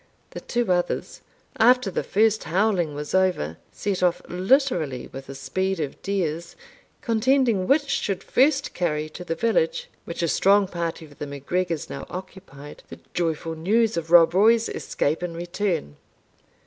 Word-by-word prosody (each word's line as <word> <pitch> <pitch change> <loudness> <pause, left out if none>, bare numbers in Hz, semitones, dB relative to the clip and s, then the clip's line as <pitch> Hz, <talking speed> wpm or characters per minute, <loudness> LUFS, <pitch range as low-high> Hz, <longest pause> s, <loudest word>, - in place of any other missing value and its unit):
The - - -6
two 240 -5 -1
others, 175 -1 -1 0.4
after 245 -2 +5
the - - -1
first 215 +1 +2
howling 180 -4 +1
was 150 0 -6
over, 185 - +1
set 200 -3 -3
off 175 -1 +2
literally 180 - +1
with 135 +1 -8
the 135 - -8
speed 190 +7 -2
of 145 -3 -4
deers, 170 -4 -2 0.5
contending 230 -4 +2
which 285 +1 +3
should 195 -8 -1
first 275 +2 +2
carry 155 -3 -1
to 180 - -9
the 165 - -3
village, 220 -7 0 0.2
which 170 - -4
a - - +2
strong 200 +4 +4
party 170 -2 -4
of 145 -2 -18
the 150 - -4
MacGregors 160 +4 -2
now 140 - -7
occupied, 180 -6 -10
the - - -10
joyful 165 -1 -1
news 215 +8 +1
of 165 -1 -3
Rob 170 -1 +7
Roy's 225 +4 +4
escape 150 +4 -2
and 175 -2 -4
return. 175 - -2
180 Hz, 155 wpm, -24 LUFS, 160-210 Hz, 0.5 s, Rob